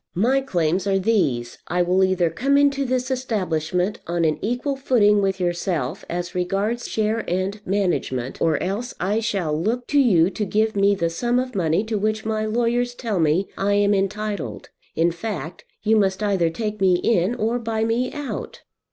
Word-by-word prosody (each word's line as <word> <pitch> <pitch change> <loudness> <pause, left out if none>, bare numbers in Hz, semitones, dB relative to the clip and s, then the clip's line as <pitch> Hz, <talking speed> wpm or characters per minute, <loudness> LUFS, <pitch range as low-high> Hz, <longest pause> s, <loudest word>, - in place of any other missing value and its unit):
My 250 +9 +2
claims 180 -6 0
are 195 -1 +2
these: 150 - 0
I 180 +1 +1
will 185 +2 +2
either 185 -3 +2
come 275 - +2
into 280 -1 +3
this 255 +1 -1
establishment 185 -7 -1
on 170 0 0
an 155 -1 +1
equal 245 +5 -1
footing 215 -6 +3
with 195 -1 0
yourself, 175 -6 -2
as 175 +1 -3
regards 195 +6 -1
share 220 +1 0
and 190 +4 -2
management, 175 -10 -1
or 160 -2 +3
else 210 +7 -3
I 200 +4 0
shall 195 -9 -1
look 225 +10 -1
to 290 - +3
you 190 -9 +4
to 210 - -3
give 215 +2 0
me 200 0 +3
the 170 -3 -1
sum 240 +8 0
of 255 0 -1
money 170 0 +1
to 220 -1 -2
which 215 +1 -1
my 215 0 -1
lawyers 240 +2 0
tell 225 -6 -2
me 160 +4 +2
I 200 +1 +2
am 205 0 +3
entitled. 205 +1 -2 0.3
In 170 +1 +2
fact, 170 -1 -6 0.2
you 220 +1 +3
must 195 0 +1
either 190 -5 +2
take 210 +4 -4
me 185 -2 +5
in 190 +3 +1
or 230 +2 0
buy 225 -1 -2
me 235 +3 0
out." 290 -2 -6
205 Hz, 180 wpm, -22 LUFS, 180-230 Hz, 0.3 s, me